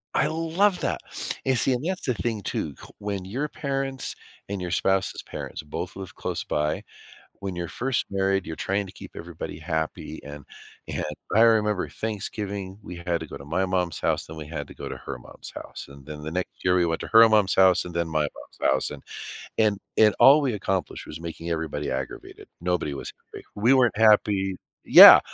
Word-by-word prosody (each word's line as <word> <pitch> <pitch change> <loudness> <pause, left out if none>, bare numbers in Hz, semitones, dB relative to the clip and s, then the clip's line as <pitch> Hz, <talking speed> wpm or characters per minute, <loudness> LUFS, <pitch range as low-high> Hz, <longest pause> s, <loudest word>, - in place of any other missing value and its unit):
I - - +3
love 165 +5 +1
that! - - -1 0.4
And 130 -1 +2
see, 130 - +3
and 125 - -2
that's 185 +2 -2
the 125 - +1
thing 110 +1 -3
too, 75 -5 -3
c - - -11
when 100 -2 -3
your 130 +10 -2
parents 135 -2 -3 0.3
and 100 -1 -4
your 90 - -3
spouse's 95 +2 +1
parents - - -7
both 75 - -5
live 95 -1 -8
close - - -3
by, 75 +1 -1 0.6
when 95 -2 -4
you're 85 -1 -3
first 125 +6 -1
married, 95 -1 +1
you're 80 - -5
trying 100 +4 -1
to 95 - -10
keep - - -11
everybody 85 -2 -7
happy, 80 -1 -3
and 70 -1 -9 0.4
and - - -3 0.3
I 110 - +6
remember 105 -4 +3
Thanksgiving, 100 -2 -4
we 90 - -8
had 85 -1 -2
to 80 - -6
go - - -8
to 70 - -11
my 90 +5 0
mom's 90 -2 -1
house, - - 0
then 80 0 -9
we 75 - -6
had 75 -3 -5
to - - -13
go - - -7
to - - -6
her - - -6
mom's - - -11
house, - - -8
and 70 -1 -14
then 75 0 -8
the 80 +1 -5
next 90 +1 -4
year 90 -1 +3
we 90 -1 +3
went 80 -1 -1
to - - -5
her 115 0 +8
mom's 105 -4 +3
house 95 -1 +5
and 90 - -7
then 85 -1 0
my 80 -1 0
mom's 75 -2 -2
house, 65 - 0
and, 75 - -8 0.6
and 105 -3 +3 0.2
and 105 -2 +6
all 145 +3 +8
we 135 -4 0
accomplished 95 -2 -2
was 80 +2 -8
making 85 0 -5
everybody 80 -3 -2
aggravated. 65 0 -6
Nobody 90 -4 -1
was 70 - -6 0.2
happy. - - -9
We 115 +6 +4
weren't 120 -5 +4
happy 105 -3 +4 0.3
Yeah. - - +12
95 Hz, 205 wpm, -25 LUFS, 80-110 Hz, 0.6 s, Yeah